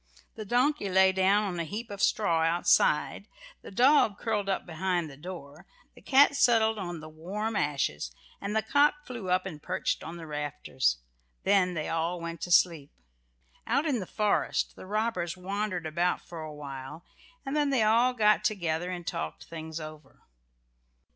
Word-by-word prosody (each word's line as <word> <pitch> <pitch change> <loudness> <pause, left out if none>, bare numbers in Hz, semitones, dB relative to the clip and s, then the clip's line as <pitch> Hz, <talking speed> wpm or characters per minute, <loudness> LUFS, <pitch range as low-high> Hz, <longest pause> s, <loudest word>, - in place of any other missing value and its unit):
The 215 - -7
donkey 250 0 +1
lay 190 0 +5
down 190 +2 +3
on 185 -4 -3
a - - 0
heap 210 +7 -6
of 200 0 -6
straw 170 -7 +2
outside, 175 - +2 0.3
the - - -10
dog 245 -1 +4
curled 210 -3 -1
up 195 - -1
behind 175 0 -1
the - - -11
door, 150 -2 -10 0.3
the - - -17
cat 285 +1 +5
settled 225 -4 +4
down 190 -3 -4
on 175 -1 -5
the 155 - -9
warm 195 +8 -4
ashes, 140 - -1 0.3
and 200 +2 -3
the 220 - +2
cock 290 +5 +2
flew 230 -7 -6
up 185 +1 +2
and 150 -2 -7
perched 185 +3 -2
on 165 +2 -7
the 165 - -8
rafters. 145 - -1 0.5
Then 185 -3 +3
they 155 -1 -3
all 165 +2 -1
went 170 -1 -6
to 175 - -4
sleep. 165 -5 +3 0.8
Out 275 +7 +1
in 275 -6 +1
the 185 - -6
forest 210 -1 0
the - - -11
robbers 205 -5 -1
wandered 190 -1 -3
about 170 +3 0
for 170 -2 -9
awhile, 150 0 -8 0.4
and 270 +2 -3
then 295 -1 +2
they 265 -5 +2
all 230 +4 +4
got 210 -2 +4
together 175 -4 -1
and 175 -2 -5
talked 80 - -4
things 160 -1 -7
over. 155 -1 -11
185 Hz, 175 wpm, -29 LUFS, 160-220 Hz, 0.8 s, lay